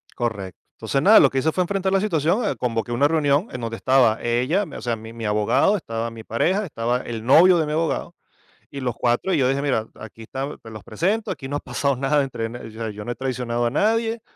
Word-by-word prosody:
Correcto. 105 -6 -4 0.2
Entonces, 135 - -1
nada, 210 +7 +7
lo 140 - +6
que 135 - -1
hice, 160 +4 +1
fue 185 - +1
enfrentar 190 +1 -1
la 195 - +4
situación. 180 - 0
Convoqué 115 -1 -2
una 140 +5 +3
reunión, 150 +3 +1
en 125 - -6
donde 115 0 -4
estaba 125 -4 +3
ella, 130 +12 +1
mi 155 - -11
o - - -7
sea, 120 -2 -1
mi 110 +1 -10
mi 115 -1 -6
abogado, 105 - +2
estaba 115 - -4
mi 115 -1 -10
pareja, 185 - 0
estaba 120 -6 -1
el 115 -2 -6
novio 175 +7 +6
de 160 - +1
mi 150 - -4
abogado, 160 +1 -2 0.6
y 140 - -7
los 125 -3 -2
cuatro. 120 +10 0
Y 165 - +2
yo 130 -2 +3
dije: 135 +1 0
"Mira, 120 -6 0
aquí 110 +1 -11
está, 135 +5 -5
te 115 - -11
los 110 -3 -10
presento, 210 +5 -1
aquí 135 - -5
no 145 - -3
ha - - -2
pasado 130 +2 -1
nada, 140 +2 +2
entre 120 -4 -4
n 120 +2 -7
O 110 - -10
sea, 110 0 -5
yo 105 0 -8
no 120 - -3
he - - -6
traicionado 120 -2 -2
a 120 - +1
nadie, 225 - +1
130 Hz, 245 wpm, -22 LUFS, 115-160 Hz, 0.6 s, nada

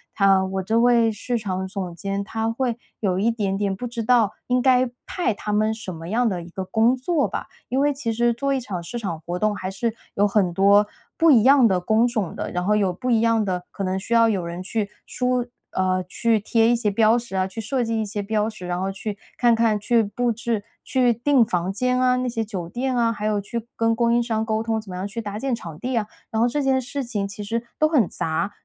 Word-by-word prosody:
他 195 -1 +4
我 190 0 -3
这 220 +4 +1
位 235 -1 +4
市 235 +3 -2
场 190 -3 -3
总 190 -3 -5
监 195 +2 -3
他 225 +2 -2
会 240 0 -1 0.2
有 190 -3 +1
一 220 +4 +2
点 205 -4 -1
点 200 -1 -1
不 220 - -6
知 235 -1 -4
道 225 -3 +3
应 250 0 +2
该 255 -1 +4 0.2
派 350 -10 -1
他 210 0 -4
们 215 +1 +2
什 215 -4 -7
么 165 +1 -8
样 240 +4 +2
的 185 -5 -2
一 170 - -10
个 190 +2 -5
工 225 +6 +3
作 290 +4 0
吧。 - - -5 0.2
因 260 - 0
为 290 0 +3
其 270 -4 -3
实 235 +1 +2
做 275 +4 -1
一 270 - +1
场 195 -8 -5
市 240 +8 -6
场 185 -8 -4
活 175 +2 -4
动 215 +1 +1
还 185 - -4
是 215 +4 -2 0.2
有 205 +1 +3
很 195 -3 +2
多 200 +3 +5 0.3
不 330 - +5
一 235 -7 +6
样 270 -2 +6
的 190 -4 +2
工 220 +6 +3
种 220 -7 -2
的， - - -4
然 180 0 -2
后 210 +2 +3
有 200 -3 +2
不 250 +7 -2
一 225 -2 +4
样 225 -2 +2
的 180 -2 -2
可 195 - -5
能 190 0 -1
需 230 - -4
要 230 0 +6
有 195 -5 0
人 170 +2 -5
去 205 +1 -2 0.2
书 250 -1 0 0.3
呃， 185 0 0
去 225 +4 +1
贴 225 +2 +2
一 240 - +4
些 230 -3 0
标 215 +2 +4
识 235 -4 -6
啊， 185 0 +2
去 190 +4 -6
设 250 +3 -1
计 225 -1 -1
一 - - 0
些 205 0 -4
标 215 +1 0
识， 215 -5 -9
然 180 +1 -2
后 195 - -1
去 200 +1 -5 0.2
看 240 -1 +4
看、 225 -2 +2
去 230 +3 +3
布 235 +3 -1
置、 230 -2 -2 0.2
去 250 -2 +2
订 245 +1 +3
房 180 -1 -1
间 250 +5 0
啊， 250 0 +4
那 255 0 -1
些 230 -2 -1
酒 190 -6 -5
店 250 +7 -2
啊， 230 -1 +3
还 210 -1 -3
有 210 -1 +1
去 230 +3 -5
跟 225 0 +2
供 235 0 +2
应 240 +1 +3
商 220 -2 -1
沟 220 0 -1
通 225 -1 -1
怎 215 - -15
么 180 - -6
样 190 +2 -3
去 230 +3 -5
搭 205 -1 -5
建 265 +2 -2
场 170 -9 -6
地 255 0 -2
啊。 215 -3 0 0.2
然 220 -1 0
后 235 - +4
这 285 +4 -1
件 265 -1 +2
事 275 +2 -4
情 210 -5 -2
其 205 +1 -7
实 230 +3 -3
都 310 - +4
很 280 - +2
杂， 165 +5 -2
220 Hz, 275 characters per minute, -23 LUFS, 195-240 Hz, 0.3 s, 一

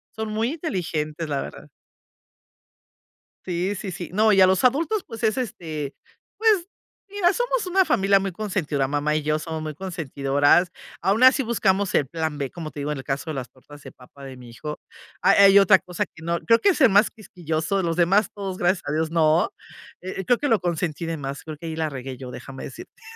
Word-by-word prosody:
son 220 0 -4
muy 225 +3 0
inteligentes, 165 - -3
la 140 -2 -1
verdad. - - -9 1.8
Sí, 180 +2 -2
sí, 195 -1 -5
sí. 175 0 -7
No, 215 +2 +4
y 195 - +5
a 185 - +8
los 190 -1 +2
adultos, 325 - +2
pues 225 +1 -9
es 220 +3 +2
este, 155 - -4 0.4
pues 425 -5 +3 0.4
mira, 395 -3 +2
somos 485 0 -1
una 375 +1 +3
familia 195 -3 +3
muy 195 -1 -3
consentidora. 170 -10 -1
Mamá 145 +2 0
y 155 - -1
yo 155 +1 0
somos 160 0 -5
muy 155 -1 -5
consentidoras. 145 -1 +1 0.3
Aún 210 +6 +2
así 260 +2 +7
buscamos 205 -5 +1
el 145 - +3
plan 160 -2 -3
B, 140 -3 -3
como 160 -3 -7
te 150 - -9
digo, 150 - -2
en 150 - -3
el 135 - -7
caso 140 +3 -3
de 155 - -2
las 130 -2 -5
tortas 145 +2 -16
de - - -11
papa 135 +2 -15
de 130 -1 -9
mi 125 -1 -13
hijo. 150 +6 -7 0.4
A 195 - +5
hay 200 0 +7
otra 195 -1 +6
cosa 180 -2 -3
que 160 - -18
no 170 0 -1
creo 230 0 +4
que 405 - +3
es 340 - 0
el 260 - +7
más 205 +2 +4
quisquilloso 170 -4 -3
de 190 - 0
los 165 -1 -1
demás, 190 +5 +3
todos 195 -2 -5
gracias 180 +1 +1
a - - -3
Dios, 160 +1 0
no. 160 0 +3 0.5
E 185 +1 -5
eh, - - -10
creo 245 +3 +3
que 290 - -2
lo 225 -4 +3
consentí 170 -2 -2
de 165 0 -3
más, 140 -1 -6
creo 155 -1 -8
que 165 - -8
ahí 160 - -4
la 160 -1 -1
regué 130 -2 -7
yo. 125 -1 -8
Déjame 135 +1 -9
decirte, 130 - -12
175 Hz, 220 wpm, -23 LUFS, 150-205 Hz, 1.8 s, a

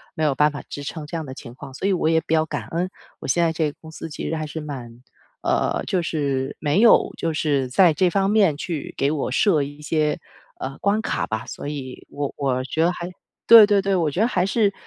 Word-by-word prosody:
没 160 - -2
有 150 -2 +3
办 150 +2 +3
法 145 - -6
支 145 - -6
撑 150 +2 -6
这 160 +3 -5
样 160 - -5
的 130 - -7
情 125 -3 -10
况， 130 +1 -11
所 140 - -5
以 - - +2
我 175 - 0
也 160 0 +3
比 160 - -3
较 160 -1 +3
感 - - -5
恩。 175 +3 -2 0.3
我 - - -7
现 170 - +2
在 165 - +2
这 160 -1 0
个 145 - -14
公 160 - -11
司 160 - -7
其 150 - -5
实 160 - -1
还 155 -1 -4
是 160 +2 -6
蛮 125 -5 -8 0.4
呃， - - 0
就 185 - 0
是 140 -4 -2
没 150 +4 +2
有 230 +1 +5
就 165 -1 -1
是 145 -4 0
在 170 +5 +5
这 180 +4 +2
方 195 +2 +1
面 200 -8 +4
去 160 0 -5
给 140 +1 +1
我 150 -2 -2
设 160 +2 +3
一 145 +1 -8
些 150 0 0 0.4
呃 135 +1 -5
关 205 +2 +1
卡 - - -2
吧。 110 0 -3
所 - - -7
以 135 -3 -7
我 145 -1 -4
我 130 -3 0
觉 160 +5 -1
得 175 - +2
还 175 0 -6 0.4
对 225 -2 +10
对 205 -1 +3
对， 195 0 0
我 165 -3 +1
觉 175 - -1
得 225 - +4
还 180 -7 +1
是 200 0 +2
155 Hz, 270 characters per minute, -22 LUFS, 145-180 Hz, 0.4 s, 对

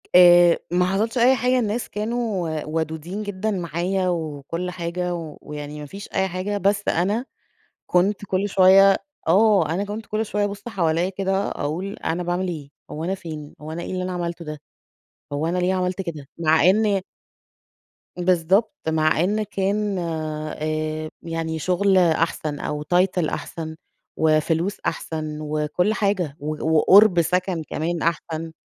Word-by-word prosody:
آآ 175 -1 +8
ما 180 +1 +3
حصلش 210 +6 0
أي 250 +2 +5
حاجة، 250 +1 +2
الناس 225 0 -2
كانوا 210 -8 -2
ودودين 160 +5 -3
جدًا 205 +1 -2
معايا 180 +1 -1
وكل 165 +1 -3
حاجة، 175 0 -3 0.3
ويعني 150 0 -7
ما 150 - -6
فيش 195 +8 -9
أي 190 0 +1
حاجة، 190 +3 -3
بس 200 +1 +1
أنا 205 +8 +1 0.6
كنت 195 +3 +2
كل 195 +1 0
شوية 195 0 +6 0.3
آه، 195 -2 +4
أنا 195 +3 -1
كنت 210 +1 -6
كل 215 +1 -2
شوية 205 0 0
بابُص 205 +2 -7
حواليّا 175 -4 +1
كده، 195 +1 -1
أقول 175 +7 -3
أنا 175 +2 -1
باعمل 175 +1 -1
إيه، 155 -5 -5 0.2
هو 155 +2 -5
أنا 185 +3 0
فين، 155 -5 -8
هو 155 +1 -7
أنا 170 +2 -4
إيه - - -5
اللي 185 - -2
أنا 185 0 -3
عملته 170 -1 -4
ده، 150 -1 -7 0.7
هو 150 +3 -1
أنا 175 +2 -1
ليه 180 +1 +1
عملت 185 0 -1
كده؟ 160 -6 -6
مع 160 -1 +3
إن 205 -1 +2 1.1
بالضبط، 180 - +2 0.2
مع 155 -1 +2
إن 210 +4 +1
كان، 200 0 -1
آآ 155 -1 -3
يعني 165 -1 -3
شغل 190 +3 +2
أحسن 160 -3 +1
أو 150 0 -3
title 180 0 +2
أحسن 160 -1 -5 0.4
وفلوس 160 +4 +2
أحسن 155 -1 -3
وكل 155 +6 0
حاجة 195 -9 0
و 155 +2 -3
وقُرب 190 +2 +7
سكن 180 0 0
كمان 165 +2 -2
أحسن. 165 0 -2
180 Hz, 150 wpm, -23 LUFS, 160-195 Hz, 1.1 s, آآ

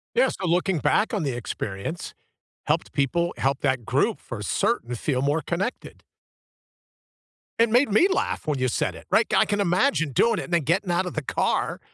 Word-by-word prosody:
Yes, - - +3
so 190 - -3
looking 175 0 +1
back 220 - +1
on 205 -6 0
the 140 - -1
experience, 120 - -5 0.5
helped - - 0
people 170 +5 0
help 135 +1 0
that 130 -4 0
group - - +1
for - - -7
certain 120 +1 -1
feel 130 +2 -1
more 145 +3 +1
connected. 180 - -4 1.6
It 230 0 +4
made 245 +2 +3
me 280 - +5
laugh 375 - -1
when 150 -2 0
you 130 - +1
said 120 - -1
it, - - -12
right, - - +4
I - - +5
can 205 - -1
imagine 180 - +1
doing 230 - +2
it - - -3
and 180 - -8
then 170 - +4
getting 175 +6 0
out 175 +2 +1
of 180 - -5
the 155 - -2
car 140 - -1
170 Hz, 190 wpm, -24 LUFS, 140-200 Hz, 1.6 s, me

